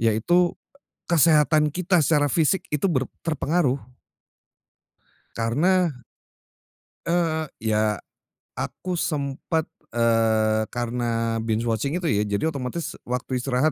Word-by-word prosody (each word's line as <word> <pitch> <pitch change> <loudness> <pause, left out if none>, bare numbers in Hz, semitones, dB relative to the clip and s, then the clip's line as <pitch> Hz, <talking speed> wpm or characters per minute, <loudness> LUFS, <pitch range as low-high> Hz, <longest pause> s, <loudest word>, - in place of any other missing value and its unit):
Yaitu, 145 +11 +2 0.5
kesehatan 155 -2 +4
kita 180 +3 +1
secara 145 0 +3
fisik 170 +3 +2
itu 150 +5 0
ber 130 -8 0
terpengaruh. 155 -3 0 1.6
Karena 145 +4 +1 1.0
Eee, 165 -3 0
ya. 110 -1 +1 0.6
Aku 180 -2 -3
sempat, 150 +2 -1 0.3
eee, 110 -2 +2
karena 115 -1 -1
binge 110 0 0
watching 120 +7 -1
itu 180 -2 -2
ya, 105 -1 +1
jadi 105 +11 0
otomatis 140 +4 -4 0.2
waktu 125 +1 -2
istirahat 135 +4 +1
140 Hz, 100 wpm, -24 LUFS, 115-165 Hz, 1.6 s, kesehatan